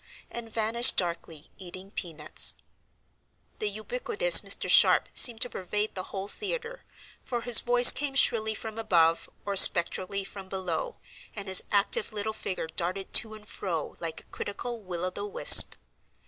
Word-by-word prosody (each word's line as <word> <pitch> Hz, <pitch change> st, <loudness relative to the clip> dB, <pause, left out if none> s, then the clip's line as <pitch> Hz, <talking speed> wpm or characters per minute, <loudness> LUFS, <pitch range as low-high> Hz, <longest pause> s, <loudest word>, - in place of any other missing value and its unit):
and 230 Hz, -1 st, -8 dB
vanished 230 Hz, +3 st, +2 dB
darkly, 170 Hz, -3 st, -4 dB
eating 185 Hz, +1 st, -10 dB
pea 175 Hz, -4 st, -6 dB
nuts. 150 Hz, -1 st, -2 dB, 1.0 s
The 210 Hz, -, -2 dB
ubiquitous 485 Hz, -, +2 dB
Mr. -, -, +1 dB
Sharp -, -, +4 dB
seemed 230 Hz, -3 st, +3 dB
to 245 Hz, -, 0 dB
pervade 205 Hz, +4 st, -3 dB
the 185 Hz, -1 st, -6 dB
whole 195 Hz, 0 st, -7 dB
theatre; 475 Hz, -, -5 dB, 0.4 s
for 240 Hz, -2 st, -5 dB
his 240 Hz, -1 st, +4 dB
voice 245 Hz, 0 st, +5 dB
came 280 Hz, -1 st, -4 dB
shrilly 220 Hz, -4 st, +2 dB
from 220 Hz, +1 st, -8 dB
above 165 Hz, -6 st, +1 dB, 0.2 s
or 200 Hz, -1 st, -4 dB
spectrally 190 Hz, +2 st, +3 dB
from 195 Hz, -1 st, -11 dB
below, 190 Hz, -, -4 dB, 0.4 s
and 200 Hz, -2 st, -7 dB
his 190 Hz, -1 st, +4 dB
active 205 Hz, +1 st, 0 dB
little 215 Hz, +1 st, -4 dB
figure 190 Hz, -5 st, -5 dB
darted 175 Hz, +4 st, -5 dB
to 220 Hz, -1 st, +3 dB
and 210 Hz, -1 st, -16 dB
fro 170 Hz, -8 st, -6 dB
like 165 Hz, -1 st, -6 dB
a -, -, -31 dB
critical 235 Hz, +3 st, -7 dB
will 180 Hz, -2 st, -6 dB
o 185 Hz, -, -4 dB
the -, -, -8 dB
wisp. 480 Hz, +5 st, +6 dB
205 Hz, 160 wpm, -26 LUFS, 185-235 Hz, 1.0 s, wisp